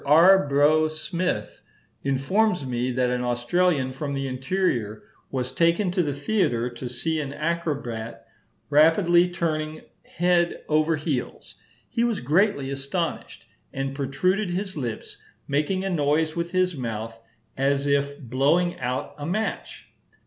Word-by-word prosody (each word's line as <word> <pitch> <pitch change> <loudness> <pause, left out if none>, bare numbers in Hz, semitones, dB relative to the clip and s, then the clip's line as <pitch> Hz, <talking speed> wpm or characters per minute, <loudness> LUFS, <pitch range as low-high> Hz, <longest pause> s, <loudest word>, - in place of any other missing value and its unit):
R. 165 +4 +6
Brough 150 +3 +4
Smith 170 +3 -3 0.4
informs 150 +6 +1
me 125 0 -1
that 125 0 +1
an 125 0 -1
Australian 130 +4 +1
from 140 +2 -4
the 135 0 -2
interior 130 - -1 0.3
was 130 -1 -3
taken 170 +6 +2
to 180 0 +1
the 150 -4 -1
theatre 140 - 0
to 120 +1 -6
see 155 +6 -1
an 140 -2 -5
acrobat 145 -8 -3 0.5
rapidly 170 +4 +5
turning 155 -3 -2 0.2
head 175 0 +1
over 155 +1 +2
heels: 145 -4 -4 0.3
"he 235 - -1
was 235 -3 0
greatly 150 - +1
astonished, 140 +5 -4 0.3
and 135 0 -3
protruded 185 +9 0
his 190 +2 -3
lips, 120 -7 -5 0.3
making 155 +7 0
a - - 0
noise 155 0 +1
with 170 0 -2
his 185 -1 +1
mouth 115 -3 -5 0.4
as 140 +1 +1
if 140 0 0
blowing 145 +7 +1
out 125 +1 -3
a 145 - -4
match." 215 +6 -3
150 Hz, 135 wpm, -25 LUFS, 130-175 Hz, 0.5 s, R